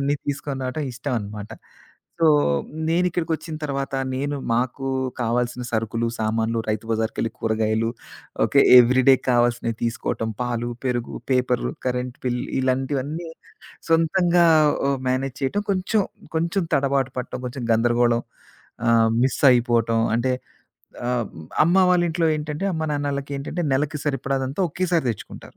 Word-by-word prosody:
అవన్నీ 140 +1 +1
తీసుకొని, 140 -1 -3
రావటం 130 +4 -3
ఇష్టం 125 +3 -4
అనమాట. 105 +1 -7 0.7
సో, 165 - +5 0.6
నేను 175 +2 +2
ఇక్కడికొచ్చిన 160 -1 -3
తర్వాత, 140 -1 -3 0.2
నేను 145 +2 -2 0.2
మాకు 130 +2 -1 0.3
కావాల్సిన 120 +1 -1
సరుకులు, 115 +1 -1
సామాన్లు 110 +1 0
రైతు 110 +1 -2
బజారుకెళ్లి 115 0 -1
కూరగాయలు, 110 0 0 0.6
ఓకే - - +4 0.2
ఎవ్రీడే 130 +2 +6 0.2
కావాల్సినవి 120 -1 +1
తీసుకోటం 115 -1 -2
పాలు, 120 -1 -2 0.2
పెరుగు, 120 -2 -2 0.2
పేపర్, 125 -1 +1 0.2
కరెంట్ 125 0 -2
బిల్ 125 -1 0 0.2
ఇలాంటివన్నీ 135 +5 -1 0.6
సొంతంగా 170 +2 +3 0.4
ఆహ్, 140 -1 +1
మేనేజ్ 130 +1 -1
చేయటం, 205 +10 0
కొంచెం 195 +3 +1 0.3
కొంచెం 170 +4 0
తడబాటు 135 -1 +1
పట్టం, 125 0 -5
కొంచెం 125 0 -5
గందరగోళం 120 +1 +2 0.7
ఆహ్, 115 -1 +5
మిస్సయిపోటం 120 -4 +3 0.2
అంటే, 130 +2 +1 0.7
ఆహ్, 125 -2 0 0.4
అమ్మ 170 +4 +3
వాళ్ళ 180 -1 +4
ఇంట్లో 165 0 +1
ఏంటంటే, 150 +3 -4
అమ్మానాన్నళ్ళకేంటంటే, 145 0 -3
నెలకి 150 +3 0
సరిపడాదంతా 135 +1 -1
ఒకేసారి 175 -2 0
తెచ్చుకుంటారు. 105 - -9
130 Hz, 115 wpm, -23 LUFS, 120-145 Hz, 0.7 s, ఎవ్రీడే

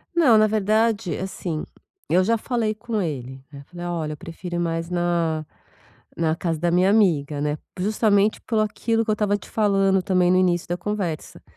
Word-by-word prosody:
Não, 280 -10 +6
na 215 0 +5
verdade, 215 -1 +1
assim, 175 -4 -4 0.5
eu 185 +2 +4
já 230 +4 +2
falei 225 -2 -1
com 220 0 -3
ele, 130 -5 -5
né? 140 - -10
Eu - - -17
falei: 175 +2 -8
"Olha, 165 -3 -3
eu - - -9
prefiro 175 +3 -6
mais 165 0 -2
na 170 -3 0 0.7
na 160 -1 +1
casa 165 -1 -2
da 175 +2 0
minha 180 +2 +3
amiga, 155 -9 +2
né?" 150 +1 -1 0.2
Justamente 210 +1 +2
pelo 225 -3 0
aquilo 225 +2 0
que 220 - -2
eu - - +4
estava 210 -1 +1
te 205 - -12
falando 195 -3 +2
também 180 -2 +2
no 185 - +4
início 175 -2 +1
da 175 - -1
conversa, 180 -4 -4
185 Hz, 185 wpm, -23 LUFS, 165-215 Hz, 0.7 s, Não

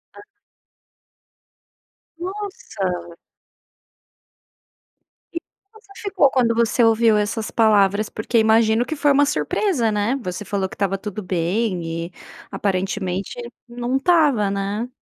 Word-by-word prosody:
Ah. - - -11 2.0
Nossa! 345 - -5 2.2
E 335 - -2
como 435 +2 -23
você 400 - -23
ficou 390 -9 +3
quando 235 -3 +2
você 235 +1 +2
ouviu 225 -1 +4
essas 215 +1 -2
palavras? 210 -2 +3
Porque 225 +2 -2
imagino 220 +1 +4
que 315 - -4
foi 290 0 +3
uma 285 +1 +4
surpresa, 290 - 0
né, 210 +5 0
você 185 +1 -5
falou 195 -2 -1
que - - -11
estava 195 -1 0
tudo 210 +1 -6
bem 175 -2 -1
e 180 - -17 0.4
aparentemente 190 +1 -2 0.3
não 245 +2 -2
estava, 280 - +3
né. 200 +4 -2
220 Hz, 115 wpm, -21 LUFS, 195-270 Hz, 2.2 s, ouviu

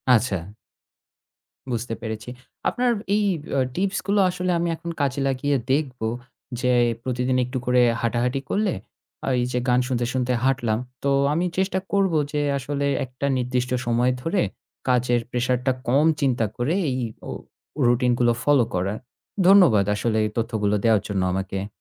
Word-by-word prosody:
আচ্ছা। 95 -7 -1 1.2
বুঝতে 115 0 -2
পেরেছি। 110 0 -5 0.4
আপনার 245 0 +1 0.2
এই 210 - +2 0.3
অ্যা 135 - +2
tips 195 +1 0
গুলো 200 +1 +2
আসলে 180 0 -1
আমি 170 - 0
এখন 170 +1 -7
কাজে 140 -1 0
লাগিয়ে 135 +2 0 0.2
দেখবো। 130 -6 -1 0.5
যে 125 -1 +2 0.3
প্রতিদিন 125 0 0
একটু 125 +2 -4
করে 125 0 +4 0.2
হাঁটাহাঁটি 120 +3 0
করলে, 205 -3 +1 0.5
আ - - +2
এই - - +1
যে 125 - +1
গান 125 0 +4
শুনতে, 120 -2 0
শুনতে 125 -1 0
হাঁটলাম। 125 -5 +1 0.2
তো 140 - +1 0.2
আমি 170 +4 +1
চেষ্টা 190 0 +1
করব 195 -3 +2 0.2
যে 150 - 0 0.2
আসলে 140 +1 -2 0.2
একটা 130 +2 -5
নির্দিষ্ট 125 0 -1
সময় 120 +1 +2
ধরে 175 +6 0 0.5
কাজের 125 -1 +2
pressure 125 0 +1
টা 130 - +4 0.2
কম 140 +5 +4 0.2
চিন্তা 125 -5 +2
করে 135 +8 0
এই 130 0 -1 0.3
অ - - -4 0.6
routine 120 0 +3
গুলো 120 -1 +4
follow 140 -5 +4
করার। 95 +4 -1 0.5
ধন্যবাদ 175 - +6
আসলে 110 +1 0
এই - - -1
তথ্যগুলো 110 -3 0
দেওয়ার 110 -3 +4
জন্য 100 -2 -1
আমাকে। 95 +1 -3
125 Hz, 155 wpm, -23 LUFS, 120-145 Hz, 1.2 s, ধন্যবাদ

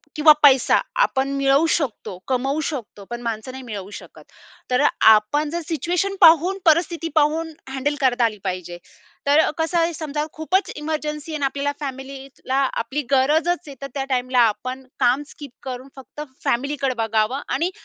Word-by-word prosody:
किंवा 305 0 +7
पैसा 265 -3 +6 0.2
आपण 270 - 0
मिळवू 275 +3 +3
शकतो, 250 - -4
कमवू 270 +3 0
शकतो 245 -9 -6
पण 240 0 -5
माणसं 230 +1 -4
नाही 260 0 -9
मिळवू 205 -5 -7
शकत. - - -15 0.5
तर 250 +2 +3 0.3
आपण 285 +9 +1
जर 340 +3 -3
सिच्युएशन 350 +5 -1
पाहून, 340 +3 +6
परिस्थिती 330 0 +2
पाहून 315 +2 +1 0.2
हँडल 270 +2 -1
करता 250 -2 +3
आली 215 -2 -2
पाहिजे. 180 -1 -4 0.5
तर 295 +3 +4
कसं 325 +2 0
आहे, 335 +1 +1
समजा 300 -1 -3
खूपच 365 +5 0
इमर्जन्सी 300 0 -4
आहे 305 - -2
आणि 280 - -1
आपल्याला 280 +1 -1
फॅमिलीला 270 -1 -6 0.2
आपली 265 +6 -2
गरजचं 295 +5 +3 0.2
आहे 280 - -9
तर 275 - -4
त्या 275 - -2
टाईमला 255 -1 +1
आपण 255 +5 -5
काम 255 +4 +2
स्किप 290 -3 -11
करून 255 0 -6
फक्त 265 +2 -10 0.2
फॅमिलीकडं 270 +1 -1
बघावं 225 +4 0
आणि 350 +3 -1
275 Hz, 160 wpm, -22 LUFS, 255-310 Hz, 0.5 s, किंवा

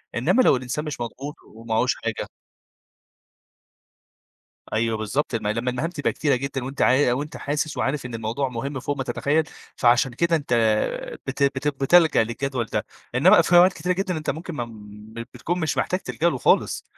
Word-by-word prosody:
إنما 255 - +3
لو 250 - +5
الإنسان 130 +4 -3
مش 150 -5 -5
مضغوط، 135 +6 -6 0.2
ومعهوش 115 0 0
حاجة؟ - - -4 2.5
أيوه 115 0 +1
بالضبط، 115 +5 -2
لمّا 105 -2 -1
لمّا 115 +3 -1
المهام 125 +7 -2
تبقى 150 -5 -1
كتيرة 145 -3 +1
جدًا 135 0 -4
وأنت 135 +2 -3
عا 130 -1 +4
وأنت 145 +4 -3
حاسس 150 +1 -2
وعارف 135 0 -1
إن 120 - -8
الموضوع 115 +5 -2
مهم 135 +3 -4
فوق 145 +3 -3
ما 130 - -3
تتخيل، 150 +4 +1 0.3
فعشان 120 +1 +3
كده 170 +4 +2
أنت 140 -5 -1 0.7
بت - - -3
بت 140 +1 +1
بتلجأ 145 -1 +4
للجدول 125 +2 -3
ده. - - -1 0.3
إنما - - +6
في 175 - +3
أوقات 180 +2 +7
كتيرة 180 0 -1
جدًا 185 -1 -2
أنت 155 - -2
ممكن 170 +2 -6
ما 120 - -2
م 105 -1 -13 0.2
بتكون 170 +9 -2
مش 155 -3 -1
محتاج 185 - 0
تلجأ 170 -2 0
له 135 - -2
خالص، - - +2
135 Hz, 175 wpm, -23 LUFS, 120-155 Hz, 2.5 s, أوقات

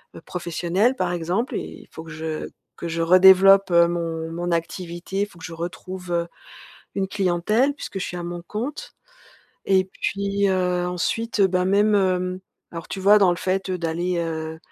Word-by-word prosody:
heu, - - -10
professionnel, 180 +7 -1
par 180 -7 -1
exemple, 175 +8 -2
il - - -8
faut 160 - -9
que 165 - -11
je 160 -1 -5 0.3
que 170 - -5
je 165 +1 -2
redéveloppe, 190 +2 +7
heu, 170 0 +6
mon 165 -1 -3
mon 175 +1 -3
activité, 175 +3 -3
il 205 - 0
faut 175 - -19
que - - -8
je 165 - -7
retrouve, 175 +2 -6
heu, 170 0 0 0.7
une 195 -1 -1
clientèle- 200 +7 +1
puisque 240 - -7
je - - -2
suis 180 - -5
à 175 - -5
mon 175 0 -5
compte- 265 - -5 0.7
et 190 -1 +4
puis, 200 +1 -1
heu, 180 -1 0
ensuite, 210 +6 -2
heu, 195 - +7
bah, 180 0 +1
même, 205 +2 +3
hem 185 -1 0 0.3
alors 165 -1 -7
tu 195 - -5
vois, 200 +2 +6
dans 195 -3 +5
le 175 - 0
fait, 190 +1 -2
heu, 185 - -2
d'aller, 170 +2 -1
heu, 160 -1 -4
180 Hz, 190 wpm, -23 LUFS, 170-195 Hz, 0.7 s, redéveloppe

